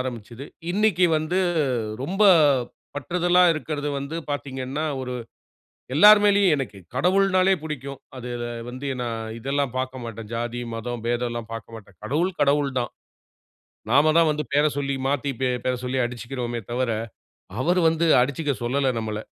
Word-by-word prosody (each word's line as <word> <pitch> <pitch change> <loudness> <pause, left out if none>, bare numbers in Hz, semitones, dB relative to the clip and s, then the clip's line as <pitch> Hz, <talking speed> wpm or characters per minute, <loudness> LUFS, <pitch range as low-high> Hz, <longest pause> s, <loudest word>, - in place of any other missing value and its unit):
ஆரம்பிச்சது. 120 0 -6 0.3
இன்னைக்கி 190 -2 +3
வந்து 155 +4 -1 0.6
ரொம்ப 190 +9 -1 0.7
பற்றுதலா 175 +5 +2
இருக்குறது 150 -2 -3
வந்து 140 +4 -5
பார்த்தீங்கன்னா, 135 +1 -3 0.2
ஒரு 125 -1 -4 0.8
எல்லார் 210 +6 +9
மேலயும் 200 -4 +4
எனக்கு 135 -8 -5 0.2
கடவுள்னாலே 185 +4 +3
புடிக்கும். 140 -3 -6 0.2
அதுல 120 -1 -5 0.2
வந்து 130 +3 -6
நான் 115 -2 -4
இதெல்லாம் 135 +1 -1
பார்க்க 130 -1 -3
மாட்டேன். 115 -2 -7
ஜாதி, 120 +1 -3
மதம், 115 0 -5
பேதம் 120 0 0
எல்லாம் 120 -1 -6
பார்க்க 115 0 -8
மாட்டேன். 100 -5 -14
கடவுள் 170 +10 -1
கடவுள் 145 0 +2
தான். 120 - -3 1.0
நாம 145 +4 +5
தான் 165 -1 +5
வந்து 150 0 -2
பேர 145 +1 +4
சொல்லி, 140 -1 -1
மாத்தி 140 0 0 0.3
பேர 130 - +2
சொல்லி 130 +1 -1
அடிச்சிக்கிறோமே 120 0 -4
தவிர, 125 0 0 0.7
அவரு 180 +2 +2
வந்து 165 +1 0 0.2
அடிச்சுக்க 140 +3 0
சொல்லல 130 +2 +1
நம்மள. 110 -1 -4
135 Hz, 135 wpm, -24 LUFS, 120-155 Hz, 1.0 s, எல்லார்